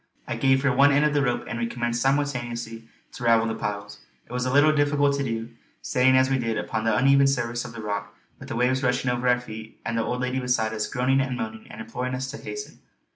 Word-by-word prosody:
I -, -, -2 dB
gave 135 Hz, 0 st, +2 dB
her 140 Hz, -, +3 dB
one 140 Hz, +2 st, +6 dB
end 145 Hz, +1 st, +3 dB
of 150 Hz, -, +2 dB
the 145 Hz, -, +2 dB
rope 120 Hz, -3 st, 0 dB
and 120 Hz, -, -4 dB
we 115 Hz, -, 0 dB
commenced 120 Hz, 0 st, -2 dB
simultaneously 120 Hz, -5 st, -1 dB, 0.2 s
to 125 Hz, -, -9 dB
ravel 115 Hz, -1 st, +4 dB
the 115 Hz, -, -1 dB
piles. 105 Hz, -, -5 dB, 0.3 s
It -, -, -19 dB
was 125 Hz, 0 st, -1 dB
a -, -, 0 dB
little 145 Hz, +3 st, +5 dB
difficult 145 Hz, -1 st, +2 dB
to 140 Hz, -, -1 dB
do, 115 Hz, -2 st, -4 dB, 0.3 s
standing 130 Hz, +1 st, +3 dB
as 130 Hz, 0 st, +4 dB
we 135 Hz, 0 st, +1 dB
did 115 Hz, -2 st, -1 dB
upon 110 Hz, 0 st, -3 dB
the 115 Hz, -, +2 dB
uneven 140 Hz, +1 st, +5 dB
surface 120 Hz, -3 st, -1 dB
of 115 Hz, -, -8 dB
the 110 Hz, -2 st, -8 dB
rock 100 Hz, -1 st, -4 dB, 0.2 s
with -, -, -10 dB
the -, -, -3 dB
waves 125 Hz, +2 st, +1 dB
rushing 125 Hz, -1 st, +1 dB
over 125 Hz, +1 st, -1 dB
our 125 Hz, 0 st, +4 dB
feet 110 Hz, -2 st, -10 dB
and 115 Hz, -, -2 dB
the 115 Hz, -, +1 dB
old 125 Hz, +2 st, -2 dB
lady 125 Hz, +1 st, -1 dB
beside 125 Hz, -3 st, 0 dB
us 110 Hz, -1 st, -2 dB
groaning 135 Hz, +1 st, +1 dB
and 130 Hz, -2 st, -2 dB
moaning 110 Hz, -1 st, -6 dB
and 110 Hz, -, -8 dB
imploring 125 Hz, +3 st, -4 dB
us 130 Hz, 0 st, -4 dB
to 145 Hz, -, -7 dB
hasten. 420 Hz, 0 st, -8 dB
125 Hz, 250 wpm, -25 LUFS, 115-135 Hz, 0.3 s, one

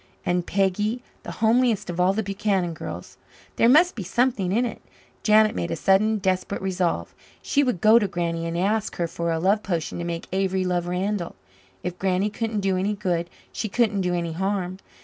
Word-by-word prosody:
And 175 Hz, -1 st, 0 dB
Peggy, 210 Hz, +5 st, 0 dB, 0.2 s
the -, -, -7 dB
homeliest 225 Hz, -2 st, +3 dB
of 175 Hz, -, -6 dB
all 180 Hz, +1 st, +4 dB
the 220 Hz, +3 st, -1 dB
Buchanan 195 Hz, -3 st, -1 dB
girls! -, -, -8 dB, 0.4 s
There 230 Hz, -, +5 dB
must 330 Hz, +7 st, +6 dB
be 225 Hz, -, -6 dB
something 200 Hz, -1 st, 0 dB
in 235 Hz, +5 st, +2 dB
it. 235 Hz, -, -6 dB, 0.4 s
Janet 215 Hz, 0 st, +5 dB
made 170 Hz, -, -2 dB
a -, -, -1 dB
sudden 195 Hz, +6 st, +3 dB
desperate 185 Hz, 0 st, -1 dB
resolve. 185 Hz, -2 st, -1 dB, 0.3 s
She 285 Hz, -, +2 dB
would 250 Hz, -11 st, 0 dB
go 220 Hz, +2 st, +7 dB
to 205 Hz, -, 0 dB
Granny 170 Hz, -2 st, -2 dB
and 165 Hz, 0 st, -3 dB
ask 210 Hz, +4 st, 0 dB
her 170 Hz, -, -1 dB
for 170 Hz, 0 st, -3 dB
a 165 Hz, -, 0 dB
love 195 Hz, +6 st, +2 dB
potion 175 Hz, -5 st, -3 dB
to -, -, -3 dB
make 170 Hz, -1 st, -4 dB
Avery 190 Hz, -1 st, 0 dB
love 175 Hz, -1 st, -1 dB
Randall. 180 Hz, 0 st, -2 dB, 0.5 s
If 180 Hz, 0 st, -4 dB
Granny 190 Hz, +2 st, +1 dB
couldn't 220 Hz, -1 st, -2 dB
do 190 Hz, -1 st, +1 dB
any 200 Hz, +3 st, 0 dB
good, 175 Hz, -4 st, -1 dB, 0.2 s
she 215 Hz, -, -3 dB
couldn't 215 Hz, -2 st, +1 dB
do 180 Hz, -1 st, 0 dB
any 170 Hz, -1 st, -2 dB
harm. 190 Hz, +1 st, -2 dB
190 Hz, 195 wpm, -24 LUFS, 175-215 Hz, 0.5 s, go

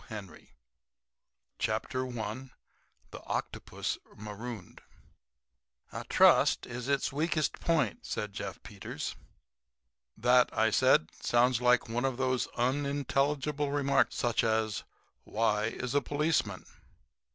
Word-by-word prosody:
The 110 Hz, -, -6 dB
Ethics 100 Hz, -4 st, -10 dB, 1.2 s
of -, -, -2 dB, 0.2 s
Pig 120 Hz, +2 st, -5 dB, 0.6 s
THE -, -, -8 dB
OCTOPUS -, -, -3 dB, 0.2 s
MAROONED 105 Hz, -1 st, -8 dB, 1.1 s
"A -, -, -5 dB
trust -, -, +5 dB
is 125 Hz, 0 st, -6 dB
its 140 Hz, -1 st, 0 dB
weakest 155 Hz, +1 st, 0 dB
point," 170 Hz, +8 st, 0 dB
said 105 Hz, -2 st, -4 dB
Jeff -, -, -6 dB
Peters. -, -, -6 dB, 1.0 s
"That," 125 Hz, +2 st, +4 dB, 0.2 s
said 130 Hz, -11 st, +4 dB
I, -, -, -21 dB
"sounds 120 Hz, 0 st, +3 dB
like 125 Hz, 0 st, +4 dB
one 120 Hz, +3 st, -1 dB
of 130 Hz, -2 st, -1 dB
those 130 Hz, -1 st, 0 dB
unintelligible 140 Hz, +2 st, 0 dB
remarks 140 Hz, -1 st, +2 dB
such 120 Hz, -3 st, +1 dB
as, 110 Hz, -2 st, 0 dB, 0.4 s
'Why 105 Hz, -1 st, +1 dB
is 120 Hz, +2 st, -3 dB
a 145 Hz, -, +3 dB
policeman?'" 145 Hz, -, 0 dB
125 Hz, 110 wpm, -30 LUFS, 110-140 Hz, 1.2 s, trust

